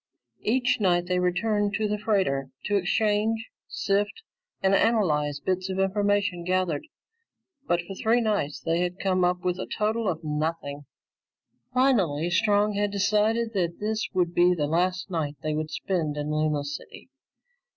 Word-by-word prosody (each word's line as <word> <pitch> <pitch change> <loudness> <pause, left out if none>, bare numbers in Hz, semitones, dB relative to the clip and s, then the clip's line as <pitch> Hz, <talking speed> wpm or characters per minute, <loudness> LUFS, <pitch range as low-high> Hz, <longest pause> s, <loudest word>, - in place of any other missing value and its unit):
Each 250 +2 +1
night 175 -3 +2
they 180 0 0
returned 205 +3 +1
to 215 -1 0
the 210 0 -2
freighter 185 -11 0 0.2
to 205 - +1
exchange, 215 +3 +1 0.2
sift, 205 - -1 0.4
and 190 0 +4
analyze 155 -10 +2
the 185 - +1
bits 185 +1 -4
of 190 - -3
information 200 -2 +1
gathered, 185 - 0 0.8
but 175 0 +2
for 195 - -8
three 225 +5 +2
nights 210 -10 -1
they 165 +1 0
had 180 +1 -1
come 185 -2 +1
up 180 0 +1
with 180 0 -1
a - - -4
total 220 +1 -1
of 165 -2 -3
nothing. 150 -1 -3 0.9
Finally, 195 - +2
Strong 210 +1 +3
had 205 0 0
decided 215 +3 +1
that 175 -4 -1
this 215 +1 -2
would 175 -2 0
be 175 +1 +4
the 150 -3 0
last 180 +5 0
night 155 -4 -2
they 155 0 -1
would 155 0 -2
spend 160 -3 -2
in 150 +1 -2
Luna 155 -1 +1
City. 145 - -8
185 Hz, 160 wpm, -26 LUFS, 165-210 Hz, 0.9 s, and